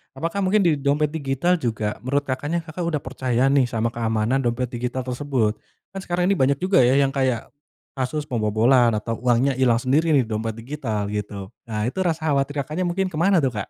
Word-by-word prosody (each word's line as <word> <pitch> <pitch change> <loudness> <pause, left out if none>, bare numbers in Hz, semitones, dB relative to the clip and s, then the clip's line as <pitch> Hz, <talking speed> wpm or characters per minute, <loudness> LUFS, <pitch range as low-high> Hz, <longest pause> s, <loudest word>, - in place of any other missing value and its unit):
apakah 170 +5 -3
mungkin 195 +1 +2
di 155 -4 +2
dompet 145 +2 +1
digital 160 +4 0
juga, 110 -5 -2
menurut 140 +3 -1
Kakaknya, 145 +5 -2
Kakak 170 +1 -5
udah 150 -4 -1
percaya 130 0 0
nih, 135 -3 +3
sama 115 0 -1
keamanan 115 +2 0
dompet 125 0 -1
digital 125 +1 -3
tersebut? 125 -4 -1 0.3
Kan 195 - -6
sekarang 180 +1 0
ini 195 - 0
banyak 135 +1 +3
juga, 185 +1 +2
ya, 125 +1 +5
yang 140 -1 +3
kayak 130 -4 -1 0.5
kasus 150 +4 -1
pembobolan 115 -1 +2
atau 115 +2 -3
uangnya 125 +2 +2
hilang 125 -3 +4
sendiri 145 +5 +2
di 130 - +4
dompet 110 0 -3
digital, 115 -5 -4
gitu. 105 -1 -5 0.2
Nah, 105 -1 -2
itu 125 +11 -3
rasa 160 -4 0
khawatir 140 0 0
Kakaknya 175 +6 -3
mungkin 185 +2 -1
ke 155 - -6
mana 180 -3 +3
tuh, 130 - +2
Kak? 105 -3 -5
135 Hz, 195 wpm, -23 LUFS, 115-155 Hz, 0.5 s, ya